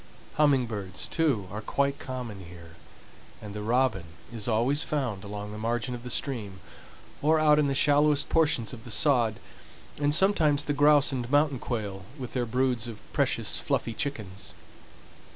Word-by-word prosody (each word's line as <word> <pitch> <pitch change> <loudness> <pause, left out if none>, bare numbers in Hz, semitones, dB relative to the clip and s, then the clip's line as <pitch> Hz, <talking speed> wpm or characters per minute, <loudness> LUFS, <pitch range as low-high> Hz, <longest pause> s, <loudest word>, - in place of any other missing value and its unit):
Humming 145 -4 +4
birds, 100 -5 -4
too, 140 - 0
are 105 +2 -5
quite 140 +5 -1
common 125 -7 -6
here, 85 -1 -12 0.7
and 105 -1 -9
the 105 - -5
robin 115 -4 +1 0.3
is 110 -3 -3
always 120 +6 +2
found 125 -10 -2
along 105 0 -6
the 105 - -7
margin 120 +3 -2
of 120 - -6
the 125 - -7
stream, 110 -9 -2 0.6
or 155 +2 +3
out 150 -1 +5
in 150 - +3
the 135 - 0
shallowest 145 +1 +3
portions 155 -8 +1
of 115 -3 -9
the - - -9
sod, 115 0 +3 0.6
and 145 0 +2
sometimes 155 -4 +3
the 145 - 0
grouse 145 0 +5
and 125 -3 -3
mountain 145 -2 +2
quail, 105 -6 -4 0.2
with 125 -3 -7
their 125 -2 -1
broods 125 -1 0
of 115 -3 -7 0.2
precious - - +1
fluffy 115 - -1
chickens. 100 - -5
125 Hz, 165 wpm, -27 LUFS, 105-145 Hz, 0.7 s, out